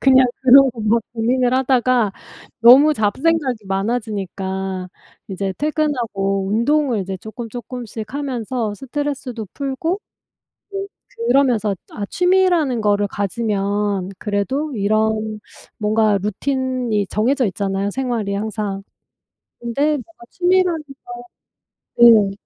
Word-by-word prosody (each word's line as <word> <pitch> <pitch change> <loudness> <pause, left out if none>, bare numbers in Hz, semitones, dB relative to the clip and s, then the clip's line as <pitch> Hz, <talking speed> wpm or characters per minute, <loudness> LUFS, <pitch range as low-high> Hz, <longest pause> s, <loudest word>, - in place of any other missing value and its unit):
그냥 260 -1 +6 0.2
그런 265 +1 +7
거 230 - -9
막 225 +2 +2
고민을 245 +2 +1
하다가 255 -4 +2 0.5
너무 275 +6 +7
잡생각이 260 +2 0
많아지니까 195 -3 -3 0.4
이제 195 0 -3
퇴근하고 230 -11 -1
운동을 240 +3 +1
이제 190 0 -4
쪼끔 220 +4 -8
쪼끔씩 235 -1 -7
하면서 250 -5 -3
스트레스도 265 -3 -4
풀고 285 +7 -2 0.7
네 390 0 -4 0.4
그러면서 240 - +2 0.2
아 205 - -4
취미라는 360 -9 +2
거를 205 -1 +2
가지면 200 -2 -1
그래도 260 +10 -2
이런 215 +1 0 0.4
뭔가 215 -1 +2
루틴이 250 -1 -1
정해져 250 +4 +1
있잖아요, 195 +1 -2
생활이 235 -5 -2
항상. 205 -1 -3 0.8
근데 235 +4 -3
뭔가 295 -3 -7
취미라는 360 -2 +2 1.2
걸 235 0 +10 0.2
네. - - -6
230 Hz, 255 characters per minute, -20 LUFS, 205-270 Hz, 1.2 s, 걸